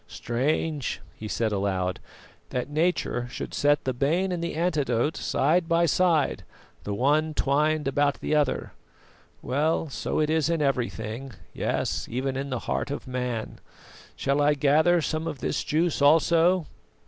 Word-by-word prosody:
"Strange," 140 +3 -1
he 110 - -8
said 110 +1 -1
aloud, 95 -2 -1 0.5
"that 125 +3 -3
Nature 155 -6 0
should - - -6
set 145 0 +2
the 130 - -1
bane 165 +9 +1
and 175 -2 -2
the 170 - -3
antidote 150 -5 0
side 165 +4 +1
by 170 +1 +4
side, 165 -3 +2 0.4
the 105 - -3
one 150 +6 +1
twined 150 +2 +1
about 145 +1 +1
the - - -2
other. 150 -3 0 0.7
Well, 155 +4 0
so 135 - -2
it 155 0 +1
is 160 -1 +2
in 165 -1 +1
everything; 125 -2 -2 0.2
yes, - - -2
even 130 +2 -2
in 135 +1 -3
the 125 -3 -3
heart - - -1
of 140 - -5
man. 125 -3 -4 0.6
Shall 140 +1 0
I 145 +1 +4
gather 155 +5 +3
some 155 +2 -2
of 155 -3 -4
this - - -2
juice 160 0 0
also? 165 +4 +4
145 Hz, 150 wpm, -26 LUFS, 130-160 Hz, 0.7 s, by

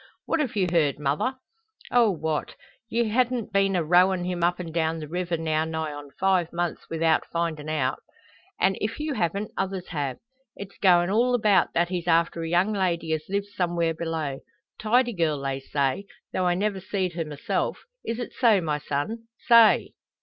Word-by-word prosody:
"What 330 - 0
have 275 -8 -1
you 195 -3 +2
heard, 155 -5 +2
mother?" 150 - -1 0.6
"Oh, 240 -3 +5
what! 160 -4 -2 0.3
Ye 235 0 +1
han't 245 -1 0
been 195 -1 +2
a 175 - +1
rowin' 180 +3 +4
him 175 -1 -2
up 175 +1 +2
and 165 -3 -6
down 165 -1 0
the 155 -2 -6
river 175 +1 -2
now 155 -1 0
nigh 160 -1 -3
on 145 -1 -9
five 185 -3 +2
months 175 -1 -3
without 165 0 +2
findin' 165 -3 -2
out. 140 -4 -1 0.6
An' 190 0 +2
if 220 +5 -2
you 300 -1 -2
haven't, 200 - -1
others 190 -1 -3
have. 140 -6 -3 0.4
It's 200 0 -9
goin' 180 -1 +4
all 245 +4 +3
about 210 -6 +3
that 170 0 +2
he's 180 -1 -3
after 165 0 +2
a 165 - -3
young 180 +5 +2
lady 170 -5 0
as 155 -1 -2
lives 200 +1 -2
somewhere 170 -2 0
below. 160 -4 -3 0.4
Tidy 240 +3 +2
girl, 160 -6 0
they 135 -1 -3
say, 140 +7 -1 0.3
tho' 185 -1 +1
I 175 - +2
never 200 +1 -1
seed 190 -1 -2
her 165 0 -2
myself. 150 -2 -3 0.2
Is 230 - -3
it 245 - -5
so, 225 -5 +4
my 155 -4 -1
son? 150 +12 -3 0.2
Say!" 230 -2 +6
175 Hz, 185 wpm, -25 LUFS, 160-200 Hz, 0.6 s, Say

